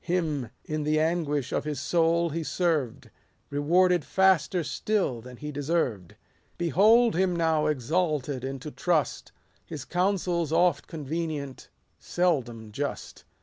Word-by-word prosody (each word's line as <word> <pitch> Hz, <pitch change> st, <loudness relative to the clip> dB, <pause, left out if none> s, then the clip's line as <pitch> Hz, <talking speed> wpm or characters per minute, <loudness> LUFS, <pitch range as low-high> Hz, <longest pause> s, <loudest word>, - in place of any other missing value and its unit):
Him, 160 Hz, -8 st, -1 dB, 0.2 s
in 155 Hz, 0 st, -3 dB
the 155 Hz, +1 st, +1 dB
anguish 155 Hz, -4 st, 0 dB
of -, -, -1 dB
his 150 Hz, -2 st, -3 dB
soul 170 Hz, +3 st, +2 dB
he 165 Hz, +3 st, -2 dB
served; 155 Hz, -8 st, -1 dB, 0.4 s
Rewarded 175 Hz, +4 st, +3 dB
faster 185 Hz, -1 st, +2 dB
still 185 Hz, -, -1 dB
than 125 Hz, +1 st, -11 dB
he 150 Hz, +3 st, -6 dB
deserved. 140 Hz, -, -2 dB, 0.4 s
Behold 215 Hz, -, +4 dB
him 185 Hz, 0 st, +1 dB
now 160 Hz, -2 st, +2 dB
exalted 150 Hz, -2 st, -1 dB
into 135 Hz, +2 st, -5 dB
trust; 160 Hz, -7 st, -1 dB, 0.3 s
His 150 Hz, -5 st, -8 dB
counsel 180 Hz, -1 st, 0 dB
's 155 Hz, -, -6 dB
oft 175 Hz, +2 st, +2 dB
convenient, 155 Hz, -3 st, -5 dB, 0.3 s
seldom 120 Hz, -11 st, -1 dB
just. 140 Hz, +6 st, -5 dB
155 Hz, 125 wpm, -27 LUFS, 140-175 Hz, 0.4 s, Behold